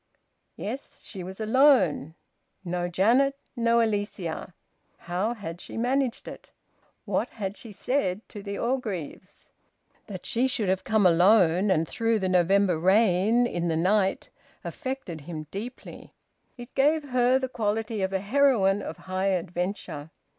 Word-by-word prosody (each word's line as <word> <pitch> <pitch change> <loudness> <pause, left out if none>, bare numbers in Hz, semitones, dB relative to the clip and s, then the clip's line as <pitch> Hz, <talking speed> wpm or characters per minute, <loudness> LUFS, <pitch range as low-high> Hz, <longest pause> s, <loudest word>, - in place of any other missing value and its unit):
Yes, 255 +7 -7
she 190 -4 -8
was 190 +3 -8
alone. 220 - +3 0.5
No 175 0 -2
Janet! 235 +10 +3 0.2
No 235 0 +3
Alicia! 205 -6 -3 0.4
How 190 +7 -2
had 175 -5 -7
she - - -8
managed 250 +1 0
it? - - -10 0.5
What - - -1
had 200 -2 -5
she 225 - -10
said 205 -2 -2
to 205 - -8
the 200 0 -5
Orgreaves? 210 - -4 0.6
That 190 -4 -8
she 245 +3 +1
should 235 -7 -1
have 190 0 0
come 220 -3 +2
alone, 180 +1 +5
and 165 -3 +2
through 225 +4 0
the 190 -3 -1
November 185 -1 +3
rain, 205 +5 +3
in 175 -7 -2
the 160 -1 0
night, 190 +3 +1 0.3
affected 260 - -5
him 155 0 -7
deeply. 235 +6 -8 0.4
It 240 0 -11
gave 290 +1 +2
her 250 0 +3
the 260 0 -2
quality 220 -2 -2
of 190 0 -1
a 190 -1 -1
heroine 205 -4 +3
of - - -6
high 185 +1 -2
adventure. 180 -4 -3
200 Hz, 140 wpm, -26 LUFS, 180-235 Hz, 0.6 s, alone